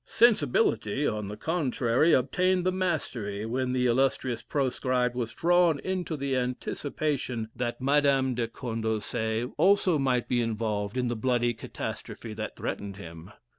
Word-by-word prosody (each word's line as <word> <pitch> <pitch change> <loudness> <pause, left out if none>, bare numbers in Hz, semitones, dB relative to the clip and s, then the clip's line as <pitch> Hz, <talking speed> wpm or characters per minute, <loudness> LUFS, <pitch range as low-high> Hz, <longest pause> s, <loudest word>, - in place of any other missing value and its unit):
Sensibility, 140 - +3
on 105 -5 -1
the 105 +1 -6
contrary, 145 -3 +1
obtained 180 +7 +2
the 185 - +3
mastery 115 - -2
when 125 +2 -1
the 125 0 +1
illustrious 125 0 +1
proscribed 130 -3 0
was 120 -2 -3
drawn 175 0 +3
into 180 -4 -2
the 140 -1 -1
anticipation 125 -1 -2
that 120 -1 -3
Madame 135 -1 +3
de 120 -1 -1
Condorcet 110 0 -2
also 185 -2 +4
might 130 -3 +1
be 120 -1 +1
involved 110 -1 -2
in 125 -1 +1
the 120 - -1
bloody 120 +1 +1
catastrophe 115 0 -6
that 110 0 -5
threatened 100 -1 -4
him. 85 -2 -10
125 Hz, 135 wpm, -28 LUFS, 115-145 Hz, -, also